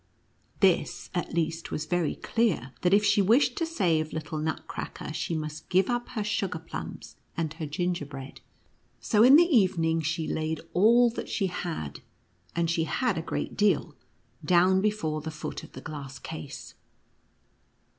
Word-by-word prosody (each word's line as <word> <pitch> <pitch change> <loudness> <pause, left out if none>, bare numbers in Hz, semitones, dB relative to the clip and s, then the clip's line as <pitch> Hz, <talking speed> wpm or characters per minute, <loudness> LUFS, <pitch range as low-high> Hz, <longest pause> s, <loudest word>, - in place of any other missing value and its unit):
This, - - +2
at - - -3
least, 165 0 -1
was 155 - -3
very 175 0 0
clear, 185 - 0
that 180 - +2
if 205 +1 +5
she 205 - +4
wished 245 +6 +4
to 330 - 0
save 165 - 0
little 155 0 -4
Nutcracker, 155 0 -4
she 165 - -2
must 155 0 -5
give 190 +4 +3
up 240 0 -2
her 215 - +1
sugar 200 -4 -1
plums 80 - -8 0.2
and 160 -2 -1
her 160 -1 -5
ginger 175 0 -2
bread. 135 -1 -9 0.6
So, 210 -3 +2
in 255 +4 +9
the 340 +3 +8
evening, 180 - +3
she 160 +1 -1
laid 160 0 -2
all 235 +5 +5
that - - -6
she 200 - 0
had 120 - -4 0.3
— - - -35
and 170 0 +1
she 165 -1 +1
had 245 +3 0
a 165 - -2
great 165 - -4
deal 210 -1 +2 0.3
— - - -40
down 185 +1 +4
before 175 -8 -1
the 160 - -5
foot 155 -1 -6
of - - -13
the - - -8
glass 140 -3 -7
case. 145 0 -8
170 Hz, 170 wpm, -28 LUFS, 155-205 Hz, 0.6 s, in